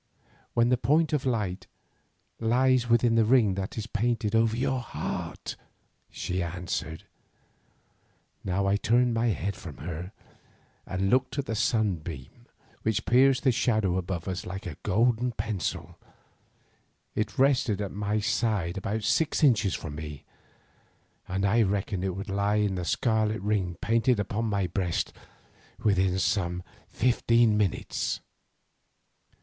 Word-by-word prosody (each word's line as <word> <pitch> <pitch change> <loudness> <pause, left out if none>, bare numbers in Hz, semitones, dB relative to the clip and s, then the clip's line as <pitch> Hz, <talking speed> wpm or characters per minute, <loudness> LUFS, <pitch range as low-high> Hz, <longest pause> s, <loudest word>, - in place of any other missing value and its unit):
"When 120 0 +4
the 125 -1 +2
point 155 +7 +2
of 140 -2 0
light 105 -6 -2 0.7
lies 125 +1 +2
within 120 0 +4
the 115 0 +4
ring 110 -3 +4
that 95 +3 -4
is 110 - -3
painted 115 -1 -1
over 115 0 +3
your 130 +1 0
heart," 120 - -5 0.5
she 90 +1 -3
answered. 85 -2 -4 1.4
Now 95 +1 0
I 100 +1 +3
turned 120 +3 +2
my 115 +1 +1
head 100 -1 -1
from 80 -6 -9
her, 85 +4 -6 0.8
and 95 +1 -1
looked 130 +1 +1
at 140 - -1
the 110 - -3
sunbeam 95 - -2 0.3
which 110 0 0
pierced 130 +2 +4
the 130 - +5
shadow 110 -7 +1
above 90 -1 -3
us 95 -1 -3
like 95 +3 -6
a 85 -5 -5
golden 120 +4 +1
pencil. 105 -4 -4 1.1
It 105 0 -2
rested 130 -6 +3
at 100 -2 -3
my 105 +1 -1
side 100 -6 0
about 105 +3 -3
six 160 +5 +1
inches 110 - +4
from 75 - -6
me, 75 -2 -7 1.0
and 95 +2 -1
I 110 +4 +4
reckoned 100 -2 0
that 95 - -1
it 90 - -3
would 100 +2 -6
lie 100 +1 0
in 105 -2 +1
the 90 -2 -3
scarlet 110 +1 +1
ring 95 -5 0
painted 115 +1 +2
upon 105 +3 -1
my 100 -3 0
breast 90 -1 -1 0.6
within 95 -3 +2
some 90 -3 0 0.3
fifteen 120 -2 +3
minutes. 105 -3 -1
105 Hz, 140 wpm, -28 LUFS, 95-120 Hz, 1.4 s, the